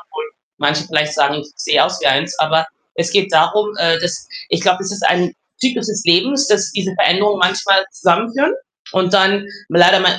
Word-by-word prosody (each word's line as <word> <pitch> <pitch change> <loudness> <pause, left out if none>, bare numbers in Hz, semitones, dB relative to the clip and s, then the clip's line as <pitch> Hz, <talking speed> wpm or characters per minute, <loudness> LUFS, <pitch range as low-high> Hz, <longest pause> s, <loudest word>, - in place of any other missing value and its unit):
obwohl 460 -1 -9 0.3
manche 150 +1 0
vielleicht 150 -1 -1
sagen, 140 -1 +1
ich 150 0 -7
sehe - - +2
aus - - -4
wie - - -1
eins, - - 0
aber 160 +1 +1 0.3
es 170 0 -2
geht 195 0 +1
darum, 210 +7 +2
äh, 165 0 +2
dass 175 -1 -4 0.2
ich - - 0
glaube, 185 -1 +1
es 195 - -4
ist 205 - -6
ein 180 -1 0 0.2
Zyklus 245 -3 -1
des 210 -1 -4
Lebens, 265 +12 +2
dass 210 0 +1
diese 190 -1 -3
Veränderungen 200 +3 +2
manchmal 195 +2 +2
zusammenführen 230 - 0 0.4
und 185 0 0
dann 195 0 +3 0.2
leider 175 +3 +5
mal 180 -1 +3
190 Hz, 190 wpm, -16 LUFS, 170-205 Hz, 0.4 s, leider